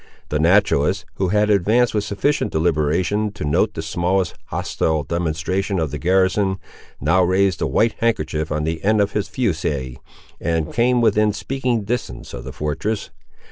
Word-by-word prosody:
The 75 Hz, -, 0 dB
naturalist, 90 Hz, +6 st, +3 dB
who 95 Hz, -, +1 dB
had 105 Hz, +2 st, +2 dB
advanced 110 Hz, +5 st, +3 dB
with 105 Hz, -2 st, 0 dB
sufficient 140 Hz, +10 st, 0 dB
deliberation 85 Hz, +6 st, +1 dB
to 75 Hz, -, -5 dB
note 85 Hz, +9 st, +1 dB
the 80 Hz, -, -4 dB
smallest 90 Hz, +2 st, 0 dB
hostile 80 Hz, -2 st, -1 dB
demonstration 85 Hz, +5 st, -1 dB
of 80 Hz, -5 st, -1 dB
the -, -, -4 dB
garrison, 95 Hz, +2 st, +2 dB, 0.4 s
now 80 Hz, +7 st, +3 dB
raised 95 Hz, 0 st, +2 dB
a -, -, +1 dB
white 115 Hz, 0 st, +2 dB
handkerchief 80 Hz, -9 st, -1 dB
on 75 Hz, 0 st, -1 dB
the 80 Hz, +1 st, -3 dB
end 110 Hz, +2 st, +3 dB
of 100 Hz, 0 st, +2 dB
his 105 Hz, -, -1 dB
fusee, 75 Hz, -, -2 dB, 0.4 s
and 80 Hz, -2 st, -1 dB
came 120 Hz, +1 st, +3 dB
within 105 Hz, -2 st, +3 dB
speaking 125 Hz, -1 st, -2 dB
distance 105 Hz, -, -4 dB
of -, -, -7 dB
the -, -, -6 dB
fortress. 80 Hz, +9 st, -3 dB
95 Hz, 160 wpm, -21 LUFS, 80-105 Hz, 0.4 s, naturalist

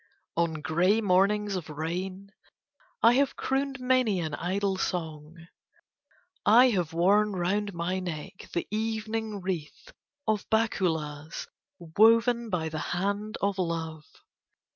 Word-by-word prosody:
On 165 Hz, -2 st, 0 dB
grey 180 Hz, +8 st, +3 dB
mornings 200 Hz, +1 st, +2 dB
of 175 Hz, -4 st, -5 dB
rain 185 Hz, +6 st, -4 dB, 0.7 s
I 235 Hz, -, +7 dB
have 275 Hz, +1 st, +2 dB
crooned 270 Hz, 0 st, -1 dB
many 250 Hz, -6 st, +2 dB
an 160 Hz, -3 st, -3 dB
idle 190 Hz, +4 st, -1 dB
song. 160 Hz, -4 st, -4 dB, 1.1 s
I 245 Hz, +4 st, +6 dB
have 180 Hz, -6 st, -1 dB
worn 200 Hz, +5 st, +3 dB
round 195 Hz, +2 st, -1 dB
my 175 Hz, +3 st, -1 dB
neck 180 Hz, +1 st, -7 dB
the 170 Hz, -, -2 dB
evening 220 Hz, -1 st, -2 dB
wreath 185 Hz, -, -5 dB, 0.4 s
of 215 Hz, -2 st, 0 dB
bakulas 160 Hz, -9 st, -1 dB, 0.3 s
woven 230 Hz, +7 st, +3 dB
by 170 Hz, -5 st, -1 dB
the 155 Hz, 0 st, -4 dB, 0.2 s
hand 200 Hz, +3 st, -2 dB
of 200 Hz, -1 st, 0 dB
love. 160 Hz, -3 st, -3 dB
190 Hz, 120 wpm, -28 LUFS, 170-215 Hz, 1.1 s, I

